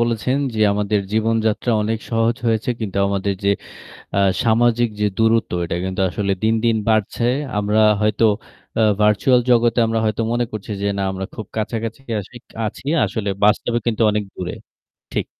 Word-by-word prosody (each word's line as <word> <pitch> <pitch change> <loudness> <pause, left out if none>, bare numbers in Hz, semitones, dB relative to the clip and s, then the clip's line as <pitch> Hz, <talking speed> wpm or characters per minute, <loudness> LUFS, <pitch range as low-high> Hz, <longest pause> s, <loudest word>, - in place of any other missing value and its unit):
বলেছেন 120 +3 0 0.2
যে 110 - -2
আমাদের 105 0 0
জীবনযাত্রা 110 +1 +1
অনেক 110 +1 -1
সহজ 115 0 +1
হয়েছে 115 +2 +1
কিন্তু 100 -3 -3
আমাদের 100 0 -1
যে 100 - +4 0.7
আ - - +3 0.2
সামাজিক 120 0 +3
যে 105 - +2
দূরত্ব, 115 0 +2
এটা 85 - -3
কিন্তু 95 0 -2
আসলে 100 +2 -2
দিনদিন 115 +1 +2
বাড়ছে। 110 +1 +1 0.3
আমরা 105 +1 +1 0.2
হয়তো 105 +1 +2 0.5
আ - - +4 0.2
ভার্চুয়াল 105 +5 +4
জগতে 120 -1 +4
আমরা 115 0 0
হয়তো 110 +1 0
মনে 120 0 +1
করছি 110 0 -6
যে 100 - 0
না - - -1
আমরা 95 0 -4
খুব 110 - -6
কাছাকাছি 115 +1 -3
কাসি 110 +1 -4 0.3
আছি। 110 +5 -6 0.2
আসলে 105 -3 -3
বাস্তবে 115 +3 +3
কিন্তু 115 -1 0
অনেক 105 0 -1
দূরে। 90 -1 -4 0.6
ঠিক। - - -1
110 Hz, 160 wpm, -20 LUFS, 105-115 Hz, 0.7 s, যে